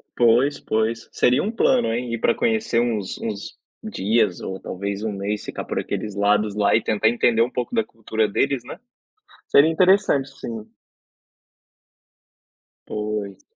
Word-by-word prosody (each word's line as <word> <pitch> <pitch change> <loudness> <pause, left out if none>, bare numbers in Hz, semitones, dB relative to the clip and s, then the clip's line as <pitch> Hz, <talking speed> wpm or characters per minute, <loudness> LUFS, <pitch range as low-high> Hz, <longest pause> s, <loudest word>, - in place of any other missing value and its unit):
Pois, 120 +4 +3
pois. 110 +1 -1
Seria 125 +2 +2
um 210 - -1
plano, 240 - +2
hein? 120 0 -3
Ir 115 - -2
para - - +2
conhecer 225 - +1
uns 110 -5 -1
uns 105 -3 -6 0.3
dias, 105 -2 0
ou 95 0 -5
talvez 100 +2 -5
um 110 - -1
mês, 100 +1 -3
ficar - - -6
por - - -2
aqueles 105 -2 -4
lados 105 +1 +1
lá, 105 -1 +3
e 110 - +2
tentar 110 0 +2
entender 120 -1 +2
um 120 - +2
pouco 125 - -4
da 225 -1 +2
cultura 110 -1 -2
deles, 135 +4 0
né? - - -9 0.7
Seria 150 +3 +5
interessante 180 -5 +3
sim. 115 -5 -7 2.2
Pois. 105 -2 -4
115 Hz, 150 wpm, -22 LUFS, 105-125 Hz, 2.2 s, Seria